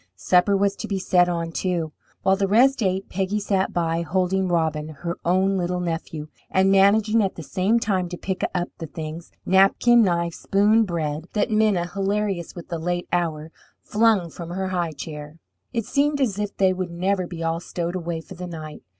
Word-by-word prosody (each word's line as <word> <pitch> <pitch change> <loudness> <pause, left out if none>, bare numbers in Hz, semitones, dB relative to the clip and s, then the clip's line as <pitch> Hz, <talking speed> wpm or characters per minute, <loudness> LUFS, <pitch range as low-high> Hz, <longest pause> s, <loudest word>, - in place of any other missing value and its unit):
Supper 185 +2 +3
was 200 0 +1
to - - -5
be 200 - -1
set 180 -1 +3
on, 170 -1 -2
too. 170 -3 -2 0.3
While 190 - +4
the 195 0 0
rest 245 +6 +4
ate, 190 -1 0
Peggy 195 +2 -1
sat 195 -2 0
by, 165 -1 0
holding 185 +2 0
Robin, 160 -3 0
her 170 +3 -5
own 190 +3 +2
little 180 0 -1
nephew, 165 -3 -4 0.2
and 190 +1 +3
managing 210 +3 +4
at 195 -2 -1
the 165 - -7
same 190 +9 +1
time 190 -5 0
to 175 - -6
pick 190 +1 -4
up 175 0 -1
the 165 - -5
things 160 +2 -7
napkin, 195 +5 +5
knife, 170 -4 +1
spoon, 210 +5 +3
bread 160 -3 -3
that 210 - 0
Minna, 215 -5 +2
hilarious 195 -1 -2
with 175 - -9
the 170 -2 -3
late 175 +2 -2
hour, 160 -3 -1 0.3
flung 210 -6 +2
from 170 +1 -8
her 190 +2 -3
high 175 -3 -1
chair. 150 0 -8 0.3
It 230 -4 -2
seemed 290 +1 +1
as 220 -7 0
if 205 -1 -3
they 190 -1 +3
would 185 -1 -3
never 185 +2 -1
be 170 -2 -6
all 165 0 0
stowed 175 0 -4
away 170 -2 -3
for 175 - -12
the 180 0 -7
night. 155 -3 -8
180 Hz, 195 wpm, -23 LUFS, 170-195 Hz, 0.3 s, napkin